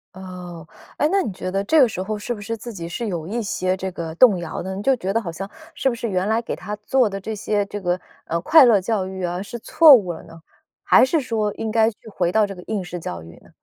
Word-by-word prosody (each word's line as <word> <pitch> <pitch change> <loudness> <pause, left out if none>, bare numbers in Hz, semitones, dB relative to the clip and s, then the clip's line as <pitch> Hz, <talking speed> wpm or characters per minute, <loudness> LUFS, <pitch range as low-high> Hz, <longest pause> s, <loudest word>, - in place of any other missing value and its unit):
哦， 180 -3 -9 0.3
诶， 295 - +3
那 395 0 +3
你 220 - -3
觉 185 0 -5
得 195 +1 -1
这 315 +10 +3
个 250 - +6
时 185 - -5
候 210 +3 -3
是 210 +4 -4
不 210 - -9
是 225 +3 -4
自 235 +2 -8
己 170 -4 -6
是 225 +7 -4
有 170 -5 -4
一 230 +5 -2
些 185 -3 -1
这 190 0 -4
个 165 -2 -6
动 205 -2 +6
摇 170 0 -5
的， 190 +1 -5
你 195 - -5
就 270 +4 +3
觉 195 -5 -3
得 230 - +1
好 170 -6 -5
像 195 +4 -7 0.3
是 270 - +1
不 240 - -3
是 230 0 -4
原 185 0 0
来 220 +2 +1
给 - - -4
他 205 +3 -6
做 235 +3 +2
的 195 0 -5
这 215 +3 -5
些 205 0 -1
这 205 +1 -6
个， 180 0 0 0.3
呃， 170 - -1
快 310 - +7
乐 225 -4 +5
教 200 -1 -1
育 190 0 -6
啊 175 +1 -2
是 220 +4 -7
错 315 +5 +7
误 190 -8 +3
了 - - -10
呢？ 165 0 -14 0.4
还 - - +6
是 315 +5 +1
说 220 -6 -1
应 225 - -4
该 220 0 +3
去 210 - -24
回 180 -4 -1
到 215 0 +3
这 195 - -7
个 180 - -11
应 210 -3 -2
试 175 0 -6
教 85 - -6
育 80 +1 -13
呢？ - - -20
200 Hz, 305 characters per minute, -22 LUFS, 180-225 Hz, 0.4 s, 快